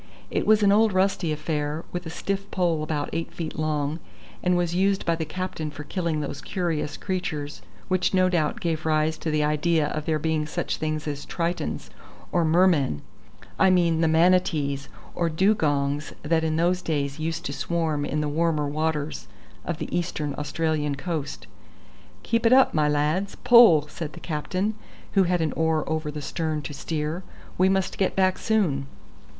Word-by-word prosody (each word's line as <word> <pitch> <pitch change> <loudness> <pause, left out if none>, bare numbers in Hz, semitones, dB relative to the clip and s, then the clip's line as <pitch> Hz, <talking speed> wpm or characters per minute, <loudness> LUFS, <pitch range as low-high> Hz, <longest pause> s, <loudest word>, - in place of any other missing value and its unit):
It - - -1
was 215 0 +5
an 200 - +5
old 215 0 +4
rusty 185 -3 +1
affair, 150 0 -2
with 175 -1 -4
a - - -4
stiff 195 +4 -3
pole 170 -4 +1
about 155 -1 -2
eight 165 +1 -3
feet 160 -2 -5
long, 155 0 -1 0.4
and 180 0 +2
was 175 -1 0
used 195 +2 +1
by 170 - +2
the 160 -1 -3
captain 175 -2 -4
for 150 0 -8
killing 165 -1 -2
those 140 -1 -5
curious 165 -5 -2
creatures 155 - -4 0.3
which 185 0 +1
no 185 -1 +4
doubt 170 -5 0
gave 160 -2 -1
rise 155 0 +2
to 160 - -3
the 150 -1 +1
idea 150 +1 +1
of 155 -1 -4
there 160 -1 +2
being 155 0 -1
such - - -2
things 155 -1 -2
as 145 -1 -4
tritons 170 0 -3 0.4
or 175 - +2
mermen 160 - +3 0.6
I 190 - +6
mean 170 -3 +3
the 165 - +4
manatees 160 -4 +2 0.2
or 170 -1 0
dugongs 150 -5 +1
that 160 +2 +1
in 155 -1 0
those 175 +3 +2
days 145 -3 -2
used 165 +1 -3
to 140 - -3
swarm 155 0 -1
in 150 +1 -1
the 150 - -1
warmer 155 -1 +1
waters 155 0 -2 0.4
of 170 - -3
the - - -4
Eastern 160 -4 -2
Australian 150 0 -1
coast. 150 -1 -4 0.8
"Keep 230 0 +2
it 235 - +5
up, 265 0 +6
my 150 -1 +2
lads; 150 +7 0
pull!" 220 -12 +7
said 155 0 -6
the - - -9
captain, 185 +6 -2 0.4
who 195 -2 +4
had 175 -1 +1
an 160 - 0
oar 160 -1 +1
over 155 -1 -2
the 150 0 -6
stern 155 -1 -2
to 145 - -6
steer. 155 +3 -3 0.4
"We 185 +1 +5
must 190 0 0
get 190 - +1
back 185 -1 +2
soon." 170 -12 +1
160 Hz, 180 wpm, -25 LUFS, 150-180 Hz, 0.8 s, pull